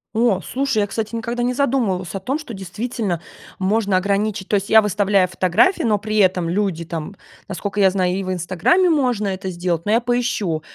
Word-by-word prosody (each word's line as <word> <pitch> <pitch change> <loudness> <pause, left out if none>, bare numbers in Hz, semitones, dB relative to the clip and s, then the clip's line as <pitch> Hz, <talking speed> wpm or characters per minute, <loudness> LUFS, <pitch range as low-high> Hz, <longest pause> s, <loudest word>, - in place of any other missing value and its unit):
О, 225 -4 +2
слушай, 270 - -2
я, 210 - +3
кстати, 220 +2 -4
никогда 235 +1 -3
не 250 +1 0
задумывалась 235 -10 0
о 195 - -3
том, 265 +10 -2
что 305 -7 -9
действительно 195 0 -3 0.4
можно 200 0 +1
ограничить. 200 +1 -1
То - - -5
есть 200 0 -1
я 220 0 +7
выставляю 200 -1 +2
фотографии, 185 - +2
но 215 -3 +2
при 215 +1 -3
этом 185 -4 +3
люди 185 -3 -1
там, 165 +4 -6 0.3
насколько 205 0 -4
я 195 -1 +6
знаю, 185 -1 0
и 195 +1 -2
в 185 - -3
"Инстаграме" 190 - +2
можно 250 -9 +1
это 190 0 -4
сделать, 175 -2 -2
но 210 - 0
я 230 - +4
поищу 235 -9 -1
205 Hz, 195 wpm, -20 LUFS, 185-235 Hz, 0.4 s, я